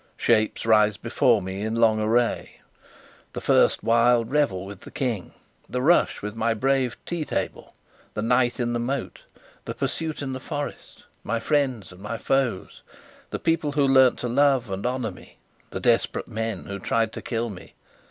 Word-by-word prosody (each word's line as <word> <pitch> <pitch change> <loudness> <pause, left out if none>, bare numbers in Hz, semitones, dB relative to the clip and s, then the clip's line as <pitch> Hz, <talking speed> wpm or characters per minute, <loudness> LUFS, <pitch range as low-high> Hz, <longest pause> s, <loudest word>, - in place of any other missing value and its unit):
Shapes 110 -2 +1
rise 105 -2 +4
before - - +2
me 95 +1 -5
in 110 +1 -2
long 115 -2 +3
array 115 +2 0 0.7
the - - -6 0.4
wild 115 0 +4
first - - -12
revel 120 -11 +1
with 100 -1 -10
the - - -11
King, 120 -8 -3 0.4
the 125 - -2
rush 170 -6 +3
with 105 0 -4
my 115 0 0
brave 130 +1 +1
tea 170 -2 -2
table, - - -4 0.4
the 105 - -2
night 120 +1 +2
in 120 -1 0
the 120 - -1
moat, 130 +2 -3 0.4
the - - -5
pursuit 160 -2 -3
in 135 -1 -3
the 130 - -4
forest: 145 +2 -6 0.2
my 115 +2 -1
friends 130 -8 0
and 90 +1 -14
my 105 +3 -4
foes, 130 -5 -1 0.5
the - - -3
people 165 -3 0
who 145 -1 +3
learnt 130 -2 +5
to 125 - -3
love 130 -3 +2
and 95 +4 -2
honour 125 -2 -2
me, - - -16 0.3
the - - -5
desperate - - +1
men 110 -3 -3
who 100 0 -6
tried 115 +3 0
to - - -6
kill 115 -1 -2
me. 90 - -12
120 Hz, 175 wpm, -25 LUFS, 110-135 Hz, 0.7 s, learnt